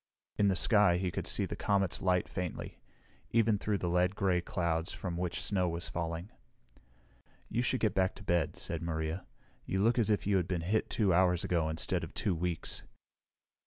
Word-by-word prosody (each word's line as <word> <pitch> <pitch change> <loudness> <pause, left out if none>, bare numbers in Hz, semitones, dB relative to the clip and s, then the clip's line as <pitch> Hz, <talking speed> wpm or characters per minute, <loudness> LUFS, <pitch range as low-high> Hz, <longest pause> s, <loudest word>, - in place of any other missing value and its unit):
In 100 - +3
the 95 - +3
sky, 100 -3 +4
he 90 0 -1
could - - -4
see - - +1
the - - -5
comet's 100 -3 +1
light 90 -1 +2
faintly, 90 -3 -5 0.5
even 110 -2 +3
through 105 0 0
the 90 - -3
lead 90 +2 +2
gray 95 -4 +2
clouds 85 -1 -1
from 90 -3 -4
which 90 0 -2
snow 90 -3 +1
was 85 +1 -4
falling. 85 +3 -4 1.2
"You 120 - 0
should 125 +1 0
get 110 -4 +2
back 95 -1 +1
to - - -11
bed," 85 -3 +1
said 85 -2 -4
Maria. 80 +1 -3 0.4
"You 95 - -2
look 115 +3 +3
as 110 - +2
if 105 - +1
you 100 -1 +3
had 90 -2 0
been 90 -2 -1
hit 105 +6 0
two 100 -5 +2
hours 90 -1 +3
ago 80 -3 +1
instead 80 0 0
of - - -8
two 100 - 0
weeks." 85 -1 -2
90 Hz, 195 wpm, -32 LUFS, 85-100 Hz, 1.2 s, sky